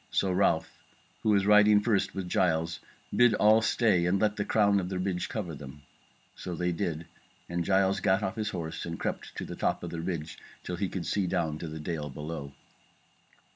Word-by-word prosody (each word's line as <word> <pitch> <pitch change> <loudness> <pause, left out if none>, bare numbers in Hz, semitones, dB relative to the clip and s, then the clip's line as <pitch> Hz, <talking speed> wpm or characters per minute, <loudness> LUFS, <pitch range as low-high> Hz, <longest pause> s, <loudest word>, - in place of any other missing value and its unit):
So 95 - +1
Ralph, 90 -3 0 0.4
who - - 0
was 100 -2 +3
riding 105 0 +6
first 105 -2 0
with 95 -2 -3
Giles, 85 -2 +1 0.4
bid 120 -2 +5
all 110 +1 +5
stay 105 -7 +2
and 95 +2 +2
let 105 0 +2
the 105 - -1
crown 100 -1 +3
of 90 -1 -3
the 95 - -3
ridge 90 -1 -2
cover 95 -7 -4
them. 70 0 -10 0.5
So 90 - -6
did 90 0 -1
they, 85 -4 -2 0.4
and 85 0 -2
Giles 95 +1 +2
gat 95 +2 +2
off 95 +2 -2
his 110 -2 -2
horse 85 -5 -5
and 85 -1 -5
crept - - -3
on - - -12
to - - -4
the - - -7
top - - -1
of - - -5
the 85 - -4
ridge 85 -3 -4 0.2
till 90 - -4
he 95 0 -1
could 90 -3 -4
see 100 -3 0
down 80 -3 -1
to 85 - -5
the 80 0 -7
dale 75 -2 -4
below. 75 0 -6
90 Hz, 210 wpm, -29 LUFS, 80-100 Hz, 0.5 s, riding